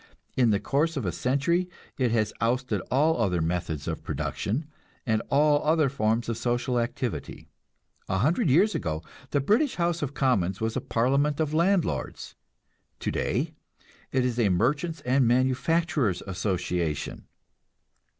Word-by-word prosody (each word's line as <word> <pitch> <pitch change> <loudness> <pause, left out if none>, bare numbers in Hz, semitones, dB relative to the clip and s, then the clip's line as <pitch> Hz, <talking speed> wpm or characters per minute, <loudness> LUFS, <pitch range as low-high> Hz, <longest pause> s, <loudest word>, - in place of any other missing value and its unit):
In 125 -3 +4
the 100 -2 +2
course 150 +6 0
of 130 - -2
a 90 - 0
century 140 - 0 0.3
it 125 -3 +1
has 110 -2 +1
ousted 125 +3 0
all 155 +5 +2
other 90 -3 +1
methods 80 -3 -2
of - - -3
production, 125 +10 -2 0.4
and 110 -2 +1
all 145 +1 +3
other 155 -2 +3
forms 115 -3 0
of 115 -1 -2
social 120 0 0
activity. 115 - -4 0.6
A 95 - +1
hundred 155 - +2
years 190 +10 +4
ago 80 - -3 0.3
the 145 - +1
British 225 - +2
House 170 -1 0
of 145 -1 -3
Commons 100 -9 +1
was 110 0 -1
a - - -1
parliament 140 +5 +1
of 155 -1 0
landlords; 175 +2 0 0.7
today - - -1 0.6
it 130 -1 +1
is 125 -1 -1
a 110 -4 +3
Merchants' 140 - 0
and 130 -1 +2
Manufacturers' 130 - +1
Association. 90 -5 -2
130 Hz, 140 wpm, -27 LUFS, 110-150 Hz, 0.7 s, In